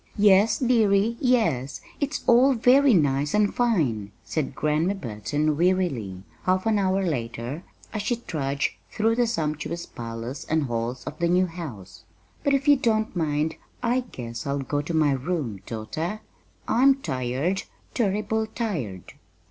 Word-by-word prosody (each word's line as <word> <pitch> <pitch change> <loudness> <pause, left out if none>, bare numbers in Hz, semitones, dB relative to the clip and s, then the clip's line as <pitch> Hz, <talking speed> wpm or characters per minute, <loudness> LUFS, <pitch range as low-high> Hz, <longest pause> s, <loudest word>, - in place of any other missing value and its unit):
"Yes, 205 +2 +5
dearie, 225 -3 +3
yes, 170 - +1 0.2
it's 285 0 -2
all 255 +3 +5
very 255 +2 +5
nice 145 -1 +2
and 210 -1 +3
fine," 145 - +1
said 150 -4 -3
Grandma 155 +7 +1
Burton 145 - -1
wearily, 150 - 0 0.2
half 185 +2 +1
an 220 -2 +2
hour 195 0 +1
later 120 +1 -3 0.3
as 215 - -2
she 240 +4 0
trudged 140 -11 -2 0.2
through 220 +1 +1
the 240 0 +2
sumptuous 165 -4 -2
parlors 115 +3 -6
and 160 -1 +1
halls 120 0 -3
of 150 - -7
the 170 - +2
new 180 +1 +4
house; 115 - -8 0.4
"but, 280 -1 +3
if 275 +2 -1
you 290 -1 +7
don't 220 -4 0
mind, 155 -1 0 0.3
I 245 +2 +2
guess 120 - -7
I'll 140 +1 0
go 140 +1 -1
to 165 +3 -5
my 155 -2 +4
room, 135 - -2
daughter. 160 - -4 0.5
I'm 270 +3 +5
tired 140 - -2 0.3
turrible 215 0 0
tired." 160 - -4
170 Hz, 145 wpm, -25 LUFS, 135-220 Hz, 0.5 s, you